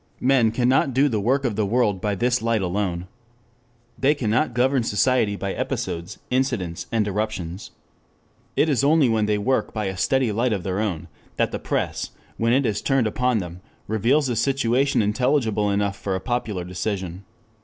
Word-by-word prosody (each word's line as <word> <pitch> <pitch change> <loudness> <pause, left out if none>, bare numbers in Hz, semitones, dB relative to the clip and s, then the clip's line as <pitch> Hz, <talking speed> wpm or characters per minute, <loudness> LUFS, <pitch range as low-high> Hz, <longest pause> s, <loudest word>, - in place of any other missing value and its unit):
Men 130 -3 +3
cannot 125 +2 +2
do 140 +2 +4
the 110 -6 0
work 130 +6 +1
of 115 -4 0
the 110 - +1
world 105 -2 +1
by 105 -1 0
this 120 +4 +1
light 115 -3 +1
alone. 90 -1 -2 0.9
They 140 +4 +3
cannot 120 +1 0
govern 130 +2 +3
society 115 -1 +2
by 100 -1 -3
episodes, 85 +5 -4
incidents, 120 -10 -1
and 110 -2 +1
eruptions. 100 -3 -3 0.9
It - - +3
is 140 -4 +1
only 145 -2 +4
when 110 -2 +1
they 105 0 +2
work 130 +5 0
by 110 -1 -1
a 95 0 -3
steady 130 +4 +1
light 115 +3 +1
of 95 -4 -3
their 95 +1 -2
own, 90 -6 -2 0.3
that - - +1
the - - -3
press, - - -2 0.3
when 115 +1 +1
it 135 +2 +3
is 110 -3 -1
turned 135 -4 +2
upon 125 +3 +1
them, 90 -2 -5 0.3
reveals 120 +7 +2
a 120 - -1
situation 130 +1 +2
intelligible 110 -1 +1
enough 100 0 0
for 95 -2 -2
a - - -1
popular 110 -5 -2
decision. 90 0 -4
110 Hz, 175 wpm, -23 LUFS, 100-125 Hz, 0.9 s, do